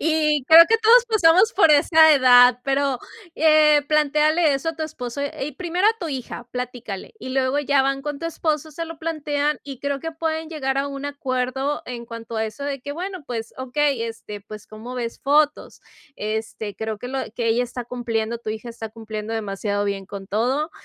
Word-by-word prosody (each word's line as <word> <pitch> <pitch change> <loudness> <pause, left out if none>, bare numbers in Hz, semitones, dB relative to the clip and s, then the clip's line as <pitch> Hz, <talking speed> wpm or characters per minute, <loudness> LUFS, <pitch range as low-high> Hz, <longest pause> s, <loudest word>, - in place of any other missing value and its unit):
y 305 -3 +1
creo 325 +4 +9
que 455 - +4
todos 470 +3 +6
pasamos 400 -1 +4
por 330 -5 +5
esa 315 +2 +6
edad, 250 -2 +6
pero, 275 -1 0 0.4
eh, 305 -1 +5
plantéale 305 +1 +3
eso 275 +4 -2
a 325 - -13
tu 320 - -4
esposo 280 -3 -5 0.2
y 285 +2 -3
primero 355 +5 -1
a 445 +1 +2
tu 340 -5 -4
hija, 250 -3 -6
platícale, 245 - -6
y 260 - -7
luego 265 +1 +1
ya 285 -1 +2
van 275 0 -1
con 295 -1 -4
tu 330 - -4
esposo, 315 -2 -2
se 330 +3 -5
lo 330 -1 -9
plantean 300 -2 -1
y 275 -3 -9
creo 280 +1 -2
que 325 +3 -5
pueden 320 0 -3
llegar 270 -4 -2
a 280 +1 -1
un 275 0 -7
acuerdo 265 0 -2
en 240 -1 -6
cuanto 230 0 -8
a 220 - 0
eso 220 +6 -6
de 280 -2 -3
que: 285 +2 -6
"Bueno, 360 0 -6
pues, 230 -2 -5
okey, 260 0 0
este, 225 -2 -7
pues, 210 0 -11
¿cómo 225 +4 -9
ves 235 -2 -5
fotos?", 295 +2 +1 0.4
este, 215 -1 -4
creo 220 +1 -4
que 245 - -7
lo 265 0 -2
que 235 -2 -2
ella 230 +2 +2
está 245 0 -6
cumpliendo, 235 -2 -3
tu 220 - -5
hija 220 +2 -6
está 230 -1 -7
cumpliendo 220 -1 -7
demasiado 205 -1 -2
bien 200 -1 -3
con 195 0 -8
todo, 255 +10 0
275 Hz, 200 wpm, -22 LUFS, 235-310 Hz, 0.4 s, creo